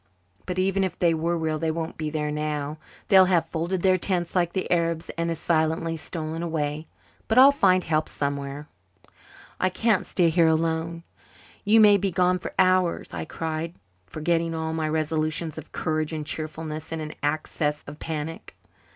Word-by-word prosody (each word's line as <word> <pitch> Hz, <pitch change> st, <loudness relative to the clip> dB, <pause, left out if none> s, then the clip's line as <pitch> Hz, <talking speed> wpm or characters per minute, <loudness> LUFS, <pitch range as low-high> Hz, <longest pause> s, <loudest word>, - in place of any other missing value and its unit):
But 180 Hz, -1 st, -3 dB
even 195 Hz, +1 st, +2 dB
if 185 Hz, -2 st, -2 dB
they 170 Hz, -2 st, +3 dB
were 165 Hz, +2 st, 0 dB
real 160 Hz, -1 st, -1 dB
they 160 Hz, 0 st, 0 dB
won't 160 Hz, 0 st, -3 dB
be 155 Hz, -1 st, -3 dB
there 150 Hz, -1 st, -2 dB
now 150 Hz, 0 st, -3 dB, 0.3 s
they'll 190 Hz, -3 st, +7 dB
have 180 Hz, -3 st, +2 dB
folded 170 Hz, +2 st, -2 dB
their 185 Hz, -1 st, +4 dB
tents 175 Hz, -2 st, -2 dB
like 175 Hz, -2 st, +1 dB
the 190 Hz, -, -2 dB
Arabs 170 Hz, -1 st, 0 dB
and 170 Hz, 0 st, -1 dB
as 165 Hz, -, -2 dB
silently 160 Hz, 0 st, 0 dB
stolen 160 Hz, 0 st, -5 dB
away. 155 Hz, -2 st, -2 dB, 0.4 s
But 220 Hz, -, +1 dB
I'll 270 Hz, +2 st, +9 dB
find 185 Hz, -10 st, +3 dB
help 155 Hz, -1 st, 0 dB
somewhere." 140 Hz, 0 st, -4 dB, 0.9 s
"I 185 Hz, -, +2 dB
can't 210 Hz, +2 st, +1 dB
stay 175 Hz, -3 st, +2 dB
here 165 Hz, 0 st, +4 dB
alone. 165 Hz, +1 st, 0 dB, 0.6 s
You 220 Hz, +2 st, +5 dB
may 210 Hz, -2 st, +7 dB
be 195 Hz, 0 st, 0 dB
gone 180 Hz, +1 st, +2 dB
for -, -, -6 dB
hours," 185 Hz, -2 st, +2 dB
I 80 Hz, -2 st, -4 dB
cried, 160 Hz, +1 st, -4 dB, 0.3 s
forgetting 165 Hz, -, -1 dB
all 160 Hz, 0 st, -2 dB
my 160 Hz, -1 st, -1 dB
resolutions 155 Hz, 0 st, -1 dB
of 160 Hz, -, -13 dB
courage 155 Hz, 0 st, -1 dB
and 155 Hz, -1 st, -4 dB
cheerfulness 155 Hz, 0 st, -5 dB
in 165 Hz, -, -3 dB
an 155 Hz, -1 st, -5 dB
access 150 Hz, 0 st, -1 dB
of 145 Hz, +1 st, -10 dB
panic. 160 Hz, 0 st, -5 dB
165 Hz, 175 wpm, -25 LUFS, 155-175 Hz, 0.9 s, I'll